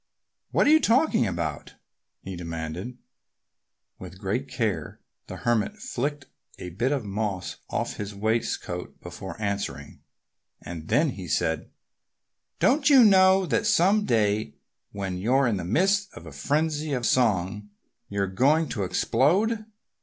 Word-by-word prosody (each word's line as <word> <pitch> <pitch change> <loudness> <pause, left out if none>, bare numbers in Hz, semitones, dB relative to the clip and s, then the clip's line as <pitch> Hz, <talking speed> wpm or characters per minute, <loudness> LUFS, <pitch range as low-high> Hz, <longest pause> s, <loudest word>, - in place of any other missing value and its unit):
"What - - +2
are 290 - +5
you 315 - +7
talking 255 - +3
about?" 85 -5 -4 0.5
he 95 0 -6
demanded. 85 +7 -6 1.0
With 95 - -10
great 105 +8 -2
care 105 - -3 0.3
the - - -7
Hermit 120 - 0
flicked 150 - -3 0.3
a 90 - -7
bit 120 +10 -1
of 135 -6 -1
moss 100 -2 -3
off - - -3
his 105 0 -6
waistcoat 105 -4 -2
before 90 +1 -8
answering. 100 -9 -4 0.6
And 80 -3 -8
then 150 -1 +2
he 95 -6 -8
said, 80 +1 -1 0.9
"Don't 280 +2 +3
you 270 -4 +8
know 190 -2 +6
that 215 +4 0
some 210 0 +4
day 105 - +1 0.4
when 95 -2 -4
you're 130 +7 +2
in 115 -5 +1
the 90 - -4
midst 195 - +1
of - - -11
a - - -9
frenzy 155 0 -1
of 125 -3 -1
song 105 -4 +1 0.4
you're 100 -1 -1
going 140 - +2
to 105 - -2
explode? 190 - +1
115 Hz, 140 wpm, -26 LUFS, -, 1.0 s, you